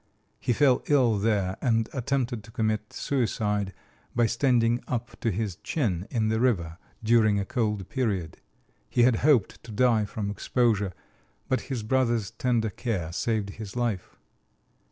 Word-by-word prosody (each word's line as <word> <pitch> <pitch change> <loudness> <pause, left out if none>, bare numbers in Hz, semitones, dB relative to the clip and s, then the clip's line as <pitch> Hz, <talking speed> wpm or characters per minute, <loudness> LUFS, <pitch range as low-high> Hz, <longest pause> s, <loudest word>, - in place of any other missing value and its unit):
He - - 0
fell 130 +1 +4
ill 125 -8 +3
there 100 -3 +1
and 115 -3 +2
attempted 125 -3 -1
to 115 - -14
commit 110 -2 -1
suicide 105 -6 -1 0.4
by 120 -1 +4
standing 120 0 +2
up 120 -1 -3
to 115 - 0
his 105 -3 -2
chin 100 - -2
in 110 -3 0
the 110 0 +1
river 90 -9 0 0.2
during 110 -2 +4
a 100 - -2
cold 105 -5 -1
period. 100 - -2 0.5
He 120 - +3
had 120 -2 +4
hoped 135 -8 +2
to 115 - -10
die 110 -1 +3
from 100 0 -4
exposure, 105 -3 +1 0.5
but 130 - +1
his 125 -5 -2
brother's 120 -3 +1
tender 115 -4 0
care 95 -7 -3
saved 105 +2 -1
his 105 0 -8
life. 115 -7 -2
115 Hz, 150 wpm, -27 LUFS, 105-125 Hz, 0.5 s, fell